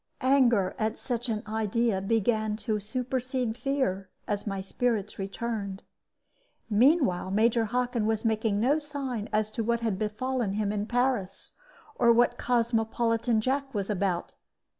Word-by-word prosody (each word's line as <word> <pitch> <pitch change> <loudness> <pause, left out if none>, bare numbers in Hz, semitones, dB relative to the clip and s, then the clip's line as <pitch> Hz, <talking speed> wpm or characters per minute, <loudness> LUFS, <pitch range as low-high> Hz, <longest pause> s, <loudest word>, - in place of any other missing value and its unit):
Anger 245 -8 +4
at 220 0 -1
such 240 -1 -3
an 215 -1 -2
idea 220 -1 0
began 215 +1 +1
to 215 -2 -2
supersede 250 +1 -2
fear, 250 -9 -1 0.2
as 205 +1 -2
my 195 -1 -2
spirits 210 +1 -2
returned. 200 0 -4 0.9
Meanwhile 230 - +3
Major 225 +3 +3
Hockin 245 -1 0
was 220 0 -1
making 220 -2 +1
no 275 +7 +3
sign 275 -7 -4
as 215 0 0
to 225 +1 -2
what 235 +1 0
had 215 -5 -1
befallen 220 0 -1
him 205 0 0
in 210 0 -2
Paris, 240 -6 -1 0.4
or 235 - +4
what 240 +1 +3
Cosmopolitan 230 -1 +1
Jack 270 +2 -1
was 200 0 -1
about. 185 -3 -1
225 Hz, 140 wpm, -28 LUFS, 210-245 Hz, 0.9 s, Anger